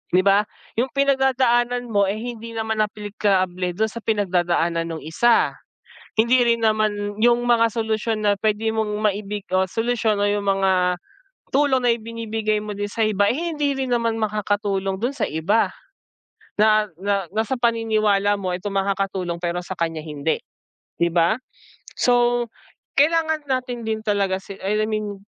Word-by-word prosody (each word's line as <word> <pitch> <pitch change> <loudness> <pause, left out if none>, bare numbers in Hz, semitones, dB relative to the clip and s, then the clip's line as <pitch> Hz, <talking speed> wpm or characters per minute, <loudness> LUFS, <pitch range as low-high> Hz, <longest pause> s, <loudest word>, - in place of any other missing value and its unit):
di 185 +1 +4
ba, 200 +1 +5 0.3
'yung 245 +4 0
pinagdadaanan 255 -2 +2
mo, 200 -1 +3
eh, 205 - -2
hindi 230 0 -6
naman 220 -1 -1
aplikable 195 -4 -1
do'n 220 0 0
sa 235 - -6
pinagdadaanan 175 -5 0
nung 160 -2 -6
isa. 230 +9 +3 0.6
Hindi 240 +3 +4
rin 230 -1 +2
naman 210 -1 0
'yung 240 +1 +5
mga 230 -1 +4
solusyon 220 -1 -1
na 205 - +4
puwede 215 +2 0
mong 220 -1 -1
maibig 210 -1 -2
o 185 0 +2
solusyon 225 0 0
o - - +3
'yung 205 0 +1
mga 190 -2 +2 0.6
tulong 270 -2 +3
na - - +4
ibinibigay 225 -1 -2
mo 210 -1 -6
din 205 - -2
sa 225 - -3
iba, 205 -2 +2
eh, - - +2 0.2
hindi 290 -2 0
rin 265 -1 -2
naman 230 -1 0
makakatulong 205 -2 -1
do'n 245 +4 0
sa - - +1
iba. 165 +9 +1 0.9
Na 215 0 +4
na 200 0 -1
nasa 220 +4 0
paniniwala 215 -4 +2
mo 190 -2 -3
itong 190 +3 -4
makakatulong 195 -3 -1
pero 175 0 -1
sa 190 - -4
kaniya 165 -2 -2
hindi, 150 +1 -1 0.6
di 170 - +2
ba? 170 +5 +3 0.6
So 240 -1 +3 0.5
kailangan 315 +1 +2
natin 250 -2 -2
din 220 0 -1
talaga 200 -3 +1
sil 195 0 -10
I 210 +2 +1
mean 210 -2 -3
215 Hz, 155 wpm, -22 LUFS, 195-230 Hz, 0.9 s, ba